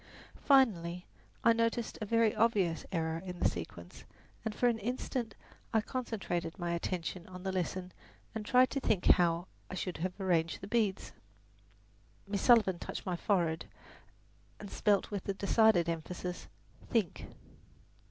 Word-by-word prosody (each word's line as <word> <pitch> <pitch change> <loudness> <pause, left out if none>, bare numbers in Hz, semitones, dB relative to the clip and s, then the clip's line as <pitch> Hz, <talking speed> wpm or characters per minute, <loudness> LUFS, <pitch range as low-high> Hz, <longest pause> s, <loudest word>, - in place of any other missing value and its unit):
Finally 180 -11 +3 0.4
I 230 - +6
noticed 230 0 -1
a 215 - -3
very 230 0 +3
obvious 200 -8 +1
error 165 -1 -1
in 180 -1 -6
the - - +3
sequence 85 -4 -7 0.4
and 220 -2 -3
for 245 - +3
an 235 -2 +1
instant 235 0 -3 0.4
I 220 - +5
concentrated 205 -9 -3
my 175 -2 -2
attention 170 0 -3
on 185 0 -9
the 190 - -1
lesson 185 0 -2 0.4
and 220 -1 -4
tried 250 +3 +4
to 275 - -1
think 210 -8 0
how 170 -1 +4 0.2
I - - -5
should 180 -1 -3
have 180 +4 -4
arranged 170 -4 +1
the 195 - -7
beads. 210 -3 0 1.2
Miss 200 0 -2
Sullivan 210 -8 +5
touched - - -6
my 180 -2 -1
forehead 170 -4 0 0.9
and 205 - -9
spelled 205 -3 +2
with 195 -1 -3
decided 200 -4 +4
emphasis, 175 +2 -4 0.4
"Think." 220 -8 0
190 Hz, 140 wpm, -32 LUFS, 175-220 Hz, 1.2 s, I